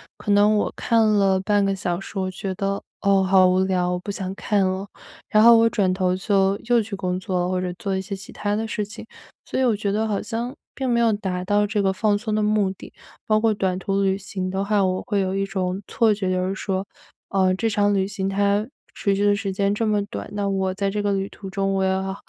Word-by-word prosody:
可 205 - -3
能 205 +1 +5
我 210 - 0
看 225 -1 +2
了 195 -3 +3
半 205 +1 +2
个 195 - 0
小 180 -2 -2
时， 195 - -9
我 185 0 -1
觉 190 0 -5
得， 200 0 -2 0.2
哦， 195 -1 +3
好 190 0 +5
无 185 +1 +2
聊， 180 -1 0
我 180 - -1
不 200 - -9
想 190 -1 -4
看 200 -2 +1
了。 190 +2 -2 0.4
然 215 0 +4
后 235 0 +9
我 230 0 +4
转 190 -5 +1
头 185 -1 +1
就 195 0 +1
又 240 -2 +5
去 210 -1 -5
工 185 -1 -2
作 185 -1 -2
了， 180 - -1
或 185 0 0
者 180 -1 -2
做 195 0 -3
一 190 - -2
些 195 +1 -5
其 195 +1 -11
它 205 0 -2
的 220 +1 -2
事 215 -2 -3
情。 205 - -10 0.4
所 - - -3
以 - - +2
我 230 - +3
觉 205 -1 -2
得 220 +2 0
好 205 -2 -1
像 240 +3 -4 0.2
并 265 -2 -3
没 235 0 +2
有 230 -1 +4
达 190 -3 -2
到 205 +2 +2
这 205 -1 0
个 195 - +2
放 205 +1 +1
松 215 0 -4
的 215 - +1
目 210 -2 +2
的。 190 - -12 0.3
包 215 0 +3
括 225 -1 +3
短 190 -3 -1
途 195 +1 -1
旅 195 0 +1
行 190 -1 -5
的 190 +1 -1
话， 205 -1 +2
我 185 0 -1
会 205 - 0
有 190 0 -1
一 195 0 0
种 190 0 -2
错 225 -2 +2
觉， 190 -3 -2
就 185 0 0
是 190 - -2
说， 190 0 -2 0.4
呃， 190 -1 +2
这 225 +3 0
场 205 -1 +2
旅 190 -1 +1
行 195 -1 -3
它 200 +1 +1 0.3
持 200 -1 0
续 205 - +1
的 205 0 +4
时 200 -1 -3
间 200 +1 0
这 225 +2 -1
么 210 -1 +1
短， - - -7
那 205 -1 -1
我 190 -1 0
在 195 0 -1
这 205 +1 -2
个 205 0 0
旅 195 0 -1
途 195 -2 -9
中 195 0 -1
我 190 0 +1
又 190 0 -1
195 Hz, 275 characters per minute, -23 LUFS, 190-210 Hz, 0.4 s, 后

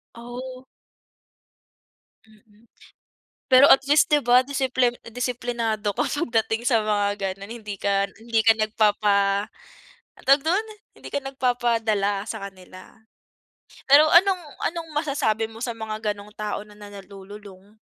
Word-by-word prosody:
Oh. 255 +2 -9 1.6
Mm, 215 +1 -25 0.8
pero 260 +2 +6
at - - +8
least 295 +2 +3
'di 300 - +5
ba 245 +1 +6
disiplin 260 -2 0 0.2
disiplinado 230 -3 -3
ka - - 0
pagdating 230 -5 -1
sa 230 -4 +3
mga 205 -1 0 0.2
gano'n, 200 +2 -10
hindi 205 -2 -7
ka 200 0 0
hindi 225 0 0
ka 225 0 +4
nagpapa 205 -2 +1 0.7
ang - - -19
tawag 275 +2 +5
dun? 360 +9 0 0.3
Hindi - - -11
ka 285 - 0
nagpapadala 230 -6 -1
sa 220 -1 -6
kanila. 185 -1 -15 1.0
Pero 290 +3 +8
anong 370 +1 +5 0.3
anong 330 -1 -8
masasabi 225 -8 -1
mo 225 0 -12
sa 235 - -4
mga 215 -1 -4
gano'ng 205 +1 -14
tao 210 -1 -4
na 210 0 -16
na 205 -1 -12
nalululong? 200 0 -13
225 Hz, 130 wpm, -23 LUFS, 205-255 Hz, 1.6 s, at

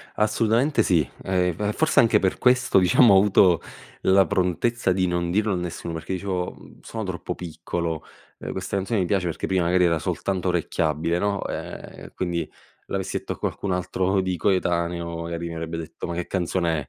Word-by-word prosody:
Assolutamente 115 +5 +2
sì, 80 -9 +2
ehm, 90 -2 +1
e 105 0 -1
forse 160 - +4
anche 115 - +4
per 95 - 0
questo, 125 -5 +4
diciamo 100 +5 +6
ho - - +7
avuto 95 -4 +5 0.4
la 95 0 +5
prontezza 95 +3 +1
di 90 0 +1
non 85 -1 -1
dirlo 105 +2 +1
a - - 0
nessuno, 90 -1 -4
perché 80 +3 -4
dicevo, 90 -1 -2
uhm: - - -16
"Sono 110 -1 -5
troppo 90 -1 -4
piccolo". 85 -2 -4 0.4
Eh - - -5
questa - - -4
canzone 100 +3 0
mi 90 - +1
piace 95 -1 0
perché 85 - -3
prima 95 -2 +1
magari 90 +1 +3
era 85 -2 +2
soltanto 95 +3 -2
orecchiabile, 85 -1 0
no, 100 +1 -1
ehm, - - -7
quindi 85 -2 -2 0.4
l'avessi - - -2
detto - - -5
a - - -13
qualcun 100 - -3
altro 95 +1 0
di 95 -1 -1
coetaneo, 85 -2 0
magari 85 0 -4
mi 85 - -6
avrebbe 80 0 -4
detto: 80 -2 -6
"Ma 85 - -4
che 90 0 -3
canzone 85 -3 0
90 Hz, 185 wpm, -24 LUFS, 85-100 Hz, 0.4 s, ho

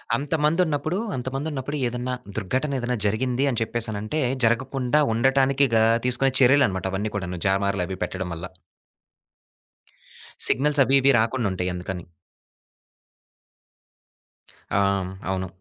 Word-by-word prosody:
అంతమందున్నప్పుడు, 155 +3 0 0.2
అంతమందున్నప్పుడు 135 +2 -4
ఏదన్నా 125 +1 -3 0.2
దుర్ఘటన 130 +9 -1
ఏదైనా 125 0 -2
జరిగింది 125 +5 0
అని 120 - -2
చెప్పేసి 115 0 -2
అనంటే, 110 +9 -3 0.2
జరగకుండా 130 +4 +1
ఉండటానికి 135 +3 +3
గా 110 - +5 0.2
తీసుకునే 130 +2 +3
చర్యలన్నమాట 120 -8 +4
అవన్నీ 105 +2 -2
కూడాను, 90 -3 -4
జామార్లు 100 -1 +1
అవి 95 -1 -5
పెట్టడం 90 0 -5
వల్ల. 85 +3 -6 2.0
సిగ్నల్స్ 145 +3 +2
అవి, 135 +1 +2
ఇవి 140 +1 +5
రాకుండుంటాయి 105 -6 -1
అందుకని. 90 -1 -6 2.7
ఆ! 100 - +4 0.2
హ్మ్. 95 0 -5 0.2
అవును. 95 0 -2
125 Hz, 110 wpm, -24 LUFS, 100-135 Hz, 2.7 s, గా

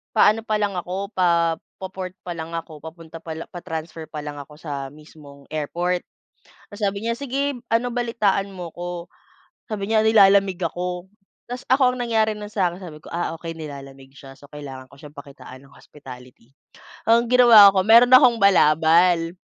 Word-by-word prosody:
pa-ano 215 +2 +4
pa 215 - -1
lang 205 -1 -1
ako, 190 +4 -5
pa, 170 -2 +2 0.3
po 190 - -4
port 185 -1 -6
pa 175 - -4
lang 160 +1 -7
ako, 160 -2 -7
papunta 165 0 -11
palang 160 0 -7
pa-transfer 165 -2 -7
pa 150 -1 -7
lang 145 -1 -7
ako 150 +1 -14
sa 140 -4 -6
mismong 150 -2 -16
airport." 175 +4 -2 0.7
Tapos 205 +1 -11
sabi 200 +2 -2
niya, 230 - 0
"Sige, 280 +1 -2 0.2
ano, 230 +2 +1
balitaan 215 -5 0
mo 175 -3 -8
ako." 175 0 -6 0.6
Sabi 210 0 -4
niya, 220 - +4
"Nilalamig 195 -3 +4
ako." 180 +2 -4 0.4
Taposs 245 +1 -7
ako, 260 -1 +3
ang 250 - -4
nangyari 220 -2 +1
na 210 0 -9
sa 200 -4 0
akin, 180 +3 -11
sabi 160 -4 -10
ko, - - -19
"Ah, 170 -1 -3
okey, 165 0 -7
nilalamig 135 -4 -10
siya. 135 -1 -13
So, 145 0 -18
kailangan 135 -3 -10
ko 140 - -18
siyang 150 0 -13
pakitaan 140 -2 -12
ng 135 - -20
hospitality." 125 -4 -15 0.6
Ang 230 +1 +3
ginawa 240 -5 +8
ko, 190 -1 +1
meron 235 +3 +7
akong 250 -3 +7
balabal 165 -1 +3
175 Hz, 175 wpm, -22 LUFS, 155-210 Hz, 0.7 s, ginawa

